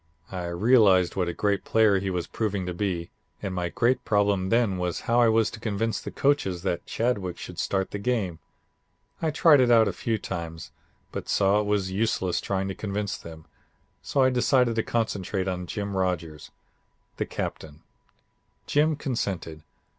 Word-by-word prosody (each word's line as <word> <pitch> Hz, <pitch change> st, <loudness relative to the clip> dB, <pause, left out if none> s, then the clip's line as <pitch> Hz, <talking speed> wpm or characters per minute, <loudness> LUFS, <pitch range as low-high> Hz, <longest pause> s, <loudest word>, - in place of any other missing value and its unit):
I 90 Hz, -2 st, -4 dB
realized 95 Hz, -1 st, +4 dB
what 90 Hz, -2 st, 0 dB
a -, -, 0 dB
great 100 Hz, +2 st, 0 dB
player 110 Hz, -3 st, +3 dB
he 95 Hz, 0 st, -2 dB
was 90 Hz, -2 st, -2 dB
proving 100 Hz, -4 st, -2 dB
to 90 Hz, -, -3 dB
be, 85 Hz, -3 st, -3 dB, 0.3 s
and 95 Hz, -, -4 dB
my 90 Hz, -1 st, -2 dB
great 125 Hz, +7 st, +1 dB
problem 100 Hz, -3 st, +1 dB
then 115 Hz, -5 st, +2 dB
was 90 Hz, -1 st, -2 dB
how 120 Hz, +1 st, +2 dB
I 115 Hz, -, +5 dB
was 110 Hz, -1 st, +2 dB
to 115 Hz, -, -9 dB
convince 110 Hz, 0 st, -2 dB
the -, -, -6 dB
coaches 95 Hz, -11 st, 0 dB
that 90 Hz, -3 st, -2 dB
Chadwick 105 Hz, -7 st, -1 dB
should 90 Hz, 0 st, -8 dB
start 95 Hz, -1 st, -1 dB
the 100 Hz, -, -4 dB
game. 100 Hz, -7 st, -1 dB, 0.8 s
I 160 Hz, -, +1 dB
tried 150 Hz, -2 st, +5 dB
it 125 Hz, -, +3 dB
out 115 Hz, -2 st, +6 dB
a 100 Hz, -, -1 dB
few 115 Hz, -1 st, -1 dB
times, 85 Hz, -5 st, -6 dB, 0.4 s
but -, -, -6 dB
saw 100 Hz, +1 st, +3 dB
it 105 Hz, -, -1 dB
was 100 Hz, -2 st, 0 dB
useless 95 Hz, -3 st, 0 dB
trying 95 Hz, -1 st, -1 dB
to -, -, -2 dB
convince 100 Hz, 0 st, -3 dB
them, 80 Hz, -1 st, -11 dB, 0.6 s
so 135 Hz, -, +1 dB
I 130 Hz, -, +4 dB
decided 125 Hz, -1 st, +3 dB
to -, -, +4 dB
concentrate 100 Hz, -4 st, -2 dB
on 90 Hz, -1 st, -3 dB
Jim 100 Hz, 0 st, -4 dB
Rodgers, 85 Hz, -5 st, -2 dB, 0.7 s
the -, -, -1 dB
Captain. 75 Hz, -1 st, -6 dB, 0.8 s
Jim 150 Hz, +2 st, +2 dB
consented. 95 Hz, -, -3 dB
100 Hz, 175 wpm, -26 LUFS, 90-115 Hz, 0.8 s, out